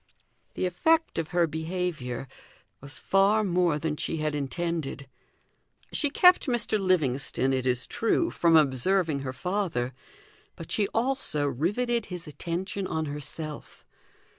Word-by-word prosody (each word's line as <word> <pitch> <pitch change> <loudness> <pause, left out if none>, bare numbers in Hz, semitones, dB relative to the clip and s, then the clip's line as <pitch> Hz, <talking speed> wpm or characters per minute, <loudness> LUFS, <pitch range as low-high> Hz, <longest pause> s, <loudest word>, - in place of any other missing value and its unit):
The - - -1
effect 320 - +2
of 160 - -2
her 175 0 +2
behaviour 160 -5 -3 0.5
was 140 -1 -9
far 200 +3 +3
more 175 -5 +2
than 150 0 -2
she 165 - -2
had 155 -1 -1
intended. 150 -1 -3 0.9
She 295 - +1
kept 360 +3 +5
Mr. 235 -3 0
Livingstone, 140 -7 +1
it 130 -1 0
is 125 0 0
true, 335 +9 0
from 170 -1 +3
observing 155 +3 +2
her 135 -1 -4
father, 175 -6 -2 0.6
but 165 - -9
she 205 -2 +1
also 225 - 0
riveted 210 - 0
his 180 -3 -5
attention 180 +5 -4
on 160 0 -2
herself. 150 +1 -7
165 Hz, 130 wpm, -27 LUFS, 145-195 Hz, 0.9 s, kept